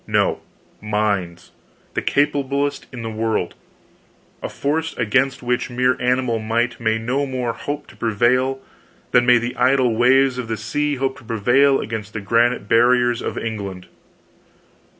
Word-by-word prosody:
No, - - +1 0.4
minds—the 105 -5 -4
capablest 140 0 0
in 125 -3 -7
the 115 - -4
world; 110 -4 -1 0.9
a - - -4
force 160 +3 -2
against 130 +4 +1
which 125 +1 -1
mere 125 +1 +1
animal 125 -2 +1
might 115 +3 -1
may 110 -1 +1
no 130 +5 -1
more 125 -3 -2
hope 145 +1 -5
to - - -17
prevail 125 +4 +1 0.5
than 120 0 +4
may 125 0 +7
the 120 +1 -3
idle 125 -2 +2
waves 130 +2 +3
of 125 - -4
the 110 0 -3
sea 145 +7 -1
hope 135 0 -2
to - - -17
prevail 120 +5 +3
against 110 -1 -5
the 110 - -3
granite 115 +1 +1
barriers 120 +1 +3
of - - -4
England. 100 -5 -5
120 Hz, 145 wpm, -20 LUFS, 110-130 Hz, 0.9 s, may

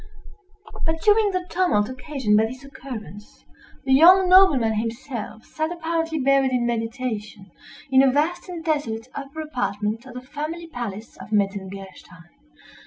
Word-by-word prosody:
But 320 0 -1
during 420 0 +4
the 370 -2 -2
tumult 340 - +1
occasioned 255 -3 -1
by 220 +1 +4
this 255 +3 -10
occurrence, 235 -7 -10 0.4
the 265 - +3
young 365 +7 +7
nobleman 360 - +6
himself 230 +1 -5
sat 315 +1 -3
apparently 330 -1 -2
buried 275 -1 +3
in 245 -1 +1
meditation, 225 -4 -4 0.4
in 265 0 +6
a 270 - +5
vast 320 +7 -1
and 340 -2 -7
desolate 255 -7 -2
upper 280 +3 -6
apartment 225 -5 -3
of 250 - -11
the 250 - -6
family 305 +5 -6
palace 230 -8 -7
of - - -11
Metzengerstein. 195 -4 -4
260 Hz, 140 wpm, -23 LUFS, 220-320 Hz, 0.4 s, young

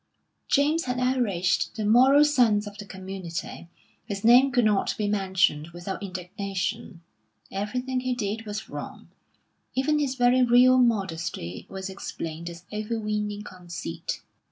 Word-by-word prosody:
James 300 +4 +2
had 250 0 -2
outraged 235 -9 +1
the 215 -2 -2
moral 260 +7 +6
sense 235 -8 +3
of 205 -1 -8
the 205 - -8
community; 185 -3 -7 0.3
his 200 -1 -5
name 250 +4 +7
could 245 -2 +3
not 210 -2 +2
be 210 - -1
mentioned 190 -7 +1
without 175 +2 -5
indignation; 190 0 -4 0.5
everything 250 +6 -2
he 255 0 -1
did 220 -1 -3
was 210 0 -5
wrong, - - -8 0.7
even 300 +4 +2
his 275 -3 -1
very 245 0 +4
real 250 +1 +6
modesty 170 - -1
was 190 0 -5
explained 170 -3 -6
as 170 0 -11
overweening 210 -1 -2
conceit. 175 - -6
210 Hz, 130 wpm, -26 LUFS, 190-250 Hz, 0.7 s, name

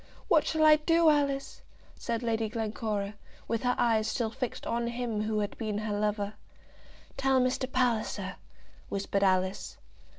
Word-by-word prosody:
"What 320 -6 +4
shall 315 -1 +2
I 305 0 +8
do, 330 +1 +4
Alice?" 280 -2 -1 0.3
said 230 0 -3
Lady 225 -1 0
Glencora, 215 -2 -2 0.3
with 230 0 -1
her 250 0 +1
eyes 220 -2 +2
still 225 -3 -1
fixed 250 +1 -4
on 235 0 -1
him 235 -3 -2
who 215 0 0
had 205 - -3
been 215 -2 -2
her 215 0 -2
lover. 205 0 -1 0.8
"Tell 270 -1 +3
Mr. 255 +1 0
Palliser," 245 -4 0 0.5
whispered 200 0 -1
Alice. 185 0 0
230 Hz, 145 wpm, -29 LUFS, 210-255 Hz, 0.8 s, I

